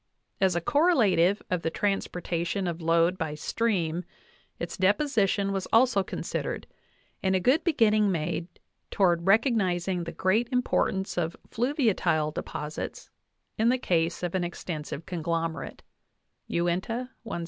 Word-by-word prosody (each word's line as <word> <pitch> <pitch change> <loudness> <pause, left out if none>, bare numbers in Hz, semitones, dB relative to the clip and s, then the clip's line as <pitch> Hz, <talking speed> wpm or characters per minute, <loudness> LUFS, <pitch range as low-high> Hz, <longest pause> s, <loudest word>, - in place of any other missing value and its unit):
As 190 -2 +3
a 170 - 0
correlative 215 - +3
of 180 -2 +1
the 165 - 0
transportation 180 -1 -1
of 170 -1 -3
load 165 +2 +2
by 155 -3 -2
stream, 175 -2 -1 0.5
its 170 - -5
deposition 200 -1 +2
was 195 -1 -2
also 230 -3 +4
considered, - - -4 0.6
and 190 0 +2
a - - +3
good 255 - +3
beginning 215 - +3
made 170 0 -2 0.4
toward 175 -3 +2
recog 225 +6 +4
nizing 180 -3 0
the 165 - -5
great 220 +6 +1
importance 195 -7 0
of 165 0 -2
fluviatile 215 - +1
deposits 150 0 -6 0.5
in 225 +2 +4
the 255 - +3
case 170 -7 0
of 175 - -2
an 185 -2 0
extensive 165 -3 -5
conglomerate 165 -2 -3 0.6
(Uinta, 185 +9 -1
170). 225 -7 -5
185 Hz, 130 wpm, -27 LUFS, 170-220 Hz, 0.6 s, also